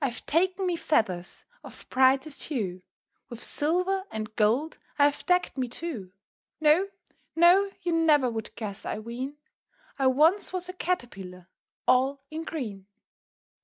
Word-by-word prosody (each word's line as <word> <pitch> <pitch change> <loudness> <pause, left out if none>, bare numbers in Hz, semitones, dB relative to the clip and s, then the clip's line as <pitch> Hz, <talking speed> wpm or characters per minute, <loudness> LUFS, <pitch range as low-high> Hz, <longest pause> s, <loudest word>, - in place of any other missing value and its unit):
_"] - - -3
I've 240 - -7
taken 370 +4 +1
me 355 -2 0
feathers 205 - -1 0.2
of - - -12
brightest 265 +3 +3
hue, 195 - -3 0.5
With 235 -1 -8
silver 365 +5 0
and 215 0 -6
gold 240 +9 +1 0.2
I 285 - +5
have 290 0 0
decked 360 -6 +1
me 255 - 0
too: 245 - -6 0.5
No, 315 +5 +4 0.5
no! 355 +4 +6
you 350 - 0
never 310 -5 +4
would 225 -2 -5
guess, 210 -3 -6
I - - -3
ween, 245 +6 -6 0.6
I 270 - +3
once 315 +10 +3
was 360 -1 -3
a 365 - -6
Caterpillar 195 - -4 0.4
all 265 +2 +3
in 315 +1 -4
green. 210 -13 -5
275 Hz, 145 wpm, -27 LUFS, 225-335 Hz, 0.6 s, no